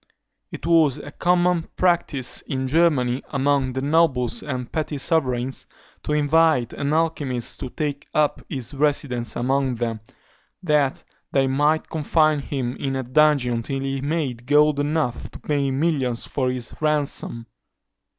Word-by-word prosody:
It - - -7
was 160 -5 +4
a 145 0 -9
common 175 0 +1
practice 170 -8 0
in 130 -3 -2
Germany, 135 -5 +2
among 135 -1 +1
the 130 +1 -3
nobles 145 -5 +2
and 130 -4 -5
petty 155 -2 -2
sovereigns, 130 -4 0 0.3
to 150 - -2
invite 150 -4 +3
an 140 +1 -2
alchymist 150 -6 -1
to 130 - -5
take 145 0 -4
up 150 -1 +1
his 130 -1 -5
residence 140 -4 0
among 130 +1 0
them, 115 -1 -2 0.6
that 150 -5 +1 0.3
they 135 -1 +3
might 145 +4 +1
confine 155 -1 +2
him 135 -3 -3
in 135 -1 -2
a 130 - -2
dungeon 130 -3 +3
till 135 +3 -4
he 135 0 -2
made 140 -5 -2
gold 150 0 +4
enough 145 -4 -1
to - - -12
pay 140 -2 0
millions 135 -4 0
for 130 -3 -1
his 125 -2 -3
ransom. 145 -6 -1
140 Hz, 140 wpm, -23 LUFS, 130-155 Hz, 0.6 s, was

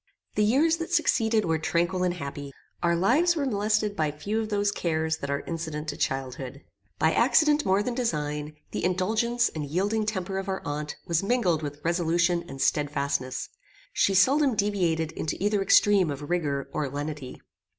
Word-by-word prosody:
The 210 - +2
years 295 +10 +3
that 335 +1 -5
succeeded 225 - +2
were 160 -1 +1
tranquil 175 +3 0
and 180 -1 +1
happy. 140 -3 -6 0.3
Our 170 -1 +2
lives 285 - +3
were 295 -3 -1
molested 210 -2 0
by 155 -4 +1
few 200 +9 -3
of 215 - -4
those 205 -1 +1
cares 160 -4 -1
that 140 - -6
are 140 0 -1
incident 160 -2 -4
to 145 - -3
childhood. 135 -2 -3 0.3
By 160 - +3
accident 295 +4 +3
more 195 +2 +3
than 245 - -2
design, 150 - -2 0.2
the - - -3
indulgence 220 +7 +1
and 155 - -5
yielding 200 +9 -1
temper 190 -2 -2
of 195 0 -5
our 190 - -3
aunt 150 +1 -4
was 170 -1 +1
mingled 195 -7 +1
with 145 -1 -6
resolution 170 +1 +1
and 135 - -9
stedfastness. 140 -2 -1 0.4
She 195 - +2
seldom 270 +6 +4
deviated 175 -6 0
into 155 - -3
either 205 +1 +1
extreme 195 -2 +4
of 145 +2 -5
rigour 145 -6 -1
or 145 -3 -1
lenity. 145 -1 -5
175 Hz, 170 wpm, -27 LUFS, 150-210 Hz, 0.4 s, seldom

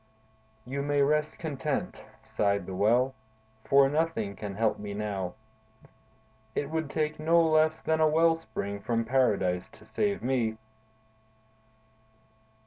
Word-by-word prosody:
"You 135 +3 -3
may 145 0 +2
rest 150 +2 +1
content," 150 -3 -3 0.2
sighed 100 -2 0
the 95 - -6
Well, 120 +7 +2 0.5
"for 140 0 +5
nothing 140 -9 -1
can 100 -1 -6
help 110 +1 +1
me 100 -1 -6
now. 100 -4 -3 1.2
It 145 +1 -2
would 160 -2 -2
take 155 0 -2
no 165 +2 +4
less 155 0 +2
than 160 0 +1
a 155 - +5
well 165 +2 +4
spring 100 -11 -5
from 115 +2 -1
Paradise 105 -8 +1
to 110 - -17
save 200 - -1
me!" 120 -4 0
135 Hz, 130 wpm, -28 LUFS, 105-155 Hz, 1.2 s, for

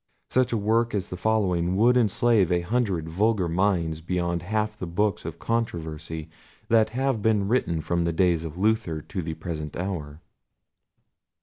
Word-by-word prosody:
Such 130 -1 +2
a 115 - +1
work 115 +2 +1
as 100 - -3
the - - -3
following 90 -3 +1
would 120 +5 +4
enslave 110 -4 +3
a 90 0 +2
hundred 95 -4 -1
vulgar 100 +2 +1
minds 85 -3 0
beyond 85 0 -1
half 105 +3 -1
the 95 -4 -6
books 100 +4 0
of - - -5
controversy 80 -8 -3 0.4
that 110 -1 +4
have 130 -1 -1
been 105 -2 +2
written 95 -9 +1
from 85 +2 0
the 85 - 0
days 85 -1 +2
of 80 0 -7
Luther 100 -6 +1
to 95 - -4
the 80 -1 -4
present 80 -2 -5
hour. 80 -5 -4
95 Hz, 165 wpm, -25 LUFS, 85-110 Hz, 0.4 s, would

